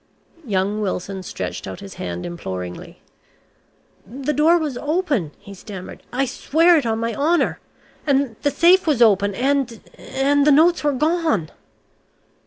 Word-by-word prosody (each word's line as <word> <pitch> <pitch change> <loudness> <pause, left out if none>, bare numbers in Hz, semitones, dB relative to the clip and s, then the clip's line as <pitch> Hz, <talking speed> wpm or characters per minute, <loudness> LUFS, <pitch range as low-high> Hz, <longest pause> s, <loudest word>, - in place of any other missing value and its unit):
Young 200 +1 0
Wilson 190 -1 -3
stretched 90 - -6
out 95 -1 -7
his 95 - -10
hand 90 0 -4
imploringly. 95 - -7 1.0
"The 265 +8 -4
door 320 +4 +4
was 305 -6 -3
open," 295 - -1
he 200 - -12
stammered. 190 -1 -9
"I 270 +2 0
swear 330 +7 +3
it 290 -7 +1
on 220 -1 0
my 230 0 -2
honour. 320 +6 +1 0.5
And 275 -4 +1
the 285 - +2
safe 350 +4 +4
was 270 -6 +4
open, 200 -2 +3
and 260 -2 0 0.2
and 280 +2 +1
the - - +7
notes 330 +4 +4
were 290 -1 +2
gone!" 305 - 0
260 Hz, 145 wpm, -21 LUFS, 195-300 Hz, 1.0 s, the